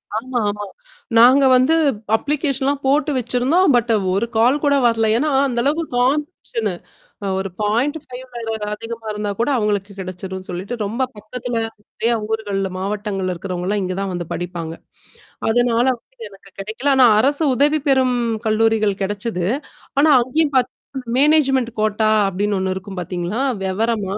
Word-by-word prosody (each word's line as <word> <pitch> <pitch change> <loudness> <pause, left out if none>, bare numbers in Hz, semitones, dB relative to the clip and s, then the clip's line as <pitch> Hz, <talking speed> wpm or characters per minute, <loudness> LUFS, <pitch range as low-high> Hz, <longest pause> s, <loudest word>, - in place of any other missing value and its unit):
ஆமா, 245 +3 -2
ஆமா. 205 0 -4 0.5
நாங்க 255 +4 +7
வந்து 255 +6 +4 0.4
அப்ளிகேஷன்லாம் 280 0 -1
போட்டு 295 +3 +2
வச்சிருந்தோம் 255 +7 +2
பட் 240 -1 +2 0.2
ஒரு 200 +4 +1
கால் 250 +6 +3
கூட 285 -1 +3
வரல 225 -1 +2
ஏன்னா 300 +5 +1 0.2
அந்த 240 -2 -2
அளவுக்கு 310 +5 0
காம்படீஷனு 255 - -1 0.7
ஒரு 195 0 -3
0.5 250 +6 -1 0.6
அதிகமா 225 +1 -7
இருந்தா 210 0 -3
கூட 235 - +1
அவங்களுக்கு 205 -2 -1
கிடைச்சிரும்ன்னு 185 0 -7
சொல்லிட்டு, 185 +6 -5
ரொம்ப 230 +6 -1
பக்கத்தில 230 +3 -4 0.2
நிறைய 225 +2 -2 0.2
ஊர்கள்ல 205 -3 -2
மாவட்டங்கள்ல் 195 -1 -2
இருக்கிறவங்கலாம் 185 +3 -2
இங்க 185 - -2
தான் 195 -1 -2
வந்து 175 -1 -4
படிப்பாங்க. 170 -2 -5 0.8
அதனால 240 +1 +2
வந்துட்டு 230 -1 -12
எனக்கு 195 0 -16
கிடைக்கல. 220 +8 -2
ஆனா 260 -1 +7
அரசு 285 +6 +2
உதவி 295 +3 +3
பெறும் 260 -2 +3 0.3
கல்லூரிகள் 220 -1 +2
கிடச்சிது. 200 -2 -2 0.5
ஆனா, 295 +3 +5
அங்கயும் 285 +4 0
பார்த்தீங்கன்னா, 255 -1 -2
மேனேஜ்மென்ட் 270 -4 +3
கோட்டா 215 0 +1 0.2
அப்டின்னு 200 +2 -1
ஒண்ணு 190 0 -1
இருக்கும் 190 0 -7
பார்த்தீங்களா? 180 +6 -3 0.2
விவரமா 205 0 -1
225 Hz, 135 wpm, -20 LUFS, 200-260 Hz, 0.8 s, நாங்க